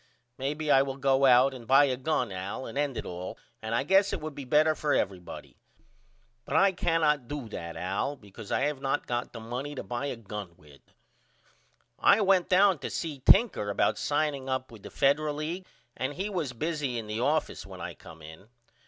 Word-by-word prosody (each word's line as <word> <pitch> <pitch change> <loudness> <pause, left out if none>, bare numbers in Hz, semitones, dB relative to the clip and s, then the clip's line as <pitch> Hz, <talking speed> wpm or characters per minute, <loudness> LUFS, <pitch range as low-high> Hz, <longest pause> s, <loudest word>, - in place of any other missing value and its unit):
Maybe 150 +3 -1
I 135 - +7
will 135 -1 -3
go 135 0 +3
out 130 +2 +6
and 120 -3 -10
buy 135 +2 +7
a 130 -2 0
gun 130 -4 -1
Al 95 +7 -5
and - - -8
end 140 -3 -1
it - - -4
all 90 +1 -6 0.2
and 110 +1 -2
I 120 - +1
guess 195 +6 +4
it - - -2
would 155 -1 -6
be 140 -1 -8
better 155 +4 +4
for 150 -1 0
everybody. 95 -3 -4 0.9
But 140 - -4
I 195 +4 +5
cannot 160 -7 +1
do 145 -4 -5
that 85 -5 -6
Al 100 +10 -2
because 105 -3 -12
I - - +1
have 145 -1 -1
not 135 -1 -1
got 120 0 -3
the 115 - -8
money 125 +6 -5
to - - -5
buy 120 +3 -3
a 135 - -3
gun 105 -5 -8
with. 75 -2 -18 1.2
I 205 - +5
went 190 -3 +3
down 190 -2 +5
to - - -5
see 155 -5 -4
Tinker 130 - +4
about 100 - +1
signing 145 -3 -1
up 130 -1 -2
with 110 -3 -12
the - - -9
Federal 145 +2 +1
League 165 +5 -4 0.3
and 130 +2 -3
he 195 +4 -3
was 165 -9 -2
busy 145 -1 -2
in 115 - -4
the 105 +1 -4
office 150 +5 0
when 95 -2 -10
I 85 0 -5
come 80 -1 -14
in. 80 +6 -12
135 Hz, 205 wpm, -28 LUFS, 115-150 Hz, 1.2 s, I